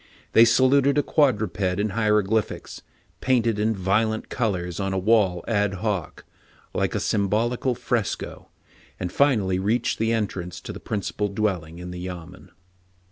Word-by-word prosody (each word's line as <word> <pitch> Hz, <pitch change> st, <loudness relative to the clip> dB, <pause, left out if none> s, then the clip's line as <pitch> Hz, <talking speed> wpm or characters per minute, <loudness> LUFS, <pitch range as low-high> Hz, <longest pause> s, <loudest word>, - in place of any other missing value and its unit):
They 115 Hz, -, +8 dB
saluted 135 Hz, +4 st, +4 dB
a 145 Hz, -, +3 dB
quad 140 Hz, -8 st, +3 dB
ruped 100 Hz, -2 st, -4 dB
in 95 Hz, +3 st, 0 dB
hieroglyphics, 105 Hz, 0 st, 0 dB, 0.4 s
painted 115 Hz, -4 st, +1 dB
in 110 Hz, +1 st, +1 dB
violent 105 Hz, +4 st, 0 dB
colors 90 Hz, -8 st, -2 dB
on 95 Hz, -1 st, -1 dB
a -, -, 0 dB
wall 95 Hz, -3 st, +2 dB
ad 105 Hz, -3 st, +1 dB
hoc, 100 Hz, -4 st, -3 dB, 0.5 s
like -, -, -1 dB
a -, -, +1 dB
symbolical 115 Hz, +5 st, 0 dB
fresco, 120 Hz, -3 st, -3 dB, 0.5 s
and 90 Hz, -1 st, -3 dB
finally 105 Hz, -9 st, +2 dB
reached 110 Hz, +5 st, 0 dB
the 115 Hz, +1 st, +1 dB
entrance 95 Hz, -6 st, -2 dB
to -, -, -7 dB
the -, -, -8 dB
principal 105 Hz, 0 st, -2 dB
dwell 100 Hz, -4 st, -1 dB
ing 80 Hz, +1 st, -12 dB
in 90 Hz, 0 st, -7 dB
the 90 Hz, -, -7 dB
yamen. 90 Hz, 0 st, -8 dB
105 Hz, 150 wpm, -24 LUFS, 95-115 Hz, 0.5 s, They